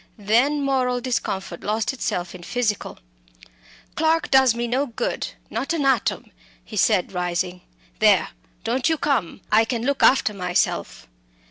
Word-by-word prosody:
Then 245 +8 +2
moral 255 -2 +1
discomfort 195 -8 -3
lost 215 +5 -1
itself 180 -8 -3
in 185 - -10
physical. 215 +1 -2 1.0
"Clarke 320 0 +1
does 265 -3 +5
me 240 0 -2
no 260 +4 0
good 235 - -3 0.2
not 260 +8 -2
an 305 -4 -1
atom," 270 - 0 0.3
he 215 - -9
said, 180 -2 +2
rising. 180 0 -2 0.4
"There - - +4 0.3
don't 250 +5 0
you 320 - +1
come. 245 - -1
I 220 +1 +6
Can 230 0 -3
look 280 0 0
after 255 -5 +4
myself." 180 -2 -1
235 Hz, 140 wpm, -23 LUFS, 195-270 Hz, 1.0 s, I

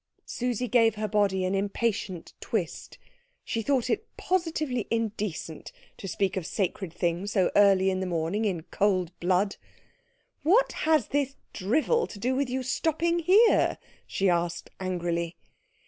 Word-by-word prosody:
Susie 250 0 -2
gave 225 -3 +4
her 215 0 -2
body 195 -2 +1
an 185 - 0
impatient 200 -2 -2
twist. - - -3 0.5
She 230 - -2
thought 260 +1 +1
it 435 +1 -1
positively 310 - -1
indecent 210 -8 -3 0.3
to 195 - -7
speak 190 +1 -1
of 190 - -2
sacred 190 -2 -2
things 175 +4 -2
so 185 -3 +2
early 195 -2 +5
in 185 - -1
the 190 - -2
morning 170 +5 -1
in 180 -6 -1
cold 185 -2 0
blood. 185 +3 +1 0.8
"What 405 +11 +4 0.2
has 310 -9 +3
this 275 -1 0 0.2
drivel 315 - +1
to - - -10
do 250 +6 0
with 275 -1 0
your 260 +1 -2
stopping 325 +6 0
here?" 395 +7 +4 0.3
she 195 - 0
asked 175 -1 0
angrily. 175 -2 -2
205 Hz, 145 wpm, -27 LUFS, 185-260 Hz, 0.8 s, early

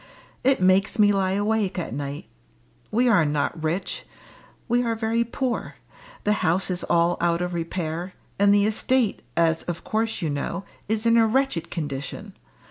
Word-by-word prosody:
It 270 +1 +3
makes 190 +5 +3
me 205 -1 +5
lie 190 -1 +1
awake 205 -1 0
at 170 -9 -3
night. 140 +1 -5 0.6
We 245 +4 +2
are 205 -8 +5
not 150 +2 -1
rich 165 +5 -2 0.6
we 240 0 +2
are 230 -2 0
very 225 +1 +1
poor 240 +1 -3 0.5
the 210 - +3
house 180 +2 +1
is 180 - -1
all 170 +1 +2
out 170 0 +2
of 180 0 -2
repair, 170 +1 -3 0.2
and 200 0 +5
the 205 0 +4
estate, 225 +2 +1 0.2
as 165 -1 +3
of 175 -1 -5
course 220 +1 -1
you 165 -5 -1
know, 160 +6 -3 0.3
is 220 +1 0
in 230 0 +5
a 225 -1 +5
wretched 225 -9 0
condition. 140 -4 -5
190 Hz, 165 wpm, -24 LUFS, 170-220 Hz, 0.6 s, me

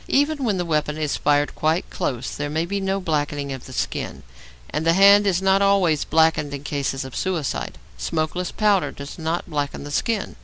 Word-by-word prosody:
Even 290 +1 +1
when 210 -6 +1
the 175 - -1
weapon 150 -2 0
is 150 -2 -1
fired 145 0 +1
quite 160 +3 0
close 125 0 -3
there 145 0 -3
may 160 +3 -1
be 200 +3 -2
no 195 0 0
blackening 145 -5 -2
of 130 - -8
the - - -10
skin, - - -3 0.5
and 155 - -1
the 165 0 +4
hand 200 +2 +7
is 190 -1 +1
not 195 +1 +4
always 195 -6 +3
blackened 160 -2 +2
in 140 - -8
cases 135 -2 -2
of 130 - -9
suicide. 175 -7 -2 0.2
Smokeless 160 - -2
powder 205 -3 +2
does 140 +4 -9
not 165 +2 -2
blacken 145 -2 -3
the 145 - -7
skin. 215 +6 -1
160 Hz, 195 wpm, -23 LUFS, 145-190 Hz, 0.5 s, hand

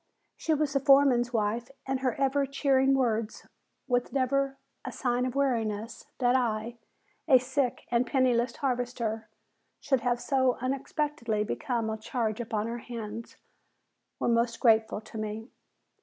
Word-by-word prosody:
She 320 - 0
was 295 -1 0
the 275 - +3
foreman's 270 -3 +5
wife, 230 +1 -1 0.2
and 265 -1 0
her 255 -3 0
ever 275 0 +2
cheering 270 -1 +3
words 230 -4 -1 0.4
with 245 -1 0
never 275 +1 0 0.3
a - - -5
sign 250 0 0
of 255 - -5
weariness 230 -5 -1
that 245 -1 +3
I, 235 -1 -1 0.5
a 265 -5 +8
sick 255 0 -1
and 240 +1 +2
penniless 250 -2 +2
harvester, 245 -4 -2 0.5
should 270 -2 +1
have 245 0 0
so 260 -2 +2
unexpectedly 260 -3 -1
become 230 +1 -2
a 220 - -3
charge 225 0 -2
upon 220 -2 -2
her 235 +1 -4
hands, 230 -1 -7 0.8
were - - 0
most 235 0 +1
grateful 220 -2 +3
to 215 0 -9
me. 215 +2 -5
245 Hz, 140 wpm, -29 LUFS, 225-270 Hz, 0.8 s, a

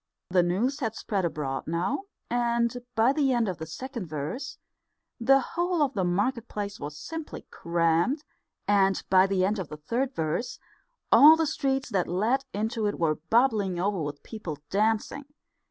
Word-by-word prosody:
The 180 -1 +5
news 210 +11 0
had 225 -5 -2
spread 195 -5 -2
abroad 140 -5 -3
now, 185 - -1 0.2
and 235 0 +1 0.2
by 230 +4 +4
the 280 -3 +2
end 235 -2 +1
of 180 -5 -3
the 160 - -6
second 235 - -6
verse 155 - -5 0.6
the 270 +3 +5
whole 345 -2 +1
of 275 -2 0
the 195 -5 0
market 215 +7 0
place 205 -1 -5
was 145 +1 -6
simply 320 - -7
crammed, 170 - +1 0.4
and 195 -2 +3
by 190 0 +6
the 190 -1 +1
end 205 +2 0
of 180 - -5
the 150 - -7
third 245 - -2
verse 160 +9 -2 0.5
all 305 +3 +9
the 320 0 +1
streets 270 -2 -1
that 185 -3 +1
led 225 +10 0
into 220 +1 -1
it 205 - -2
were 155 -2 0
bubbling 220 -7 +2
over 195 -1 0
with 145 -1 -5
people 180 -9 -6
dancing. 220 +7 0
210 Hz, 170 wpm, -27 LUFS, 175-260 Hz, 0.6 s, all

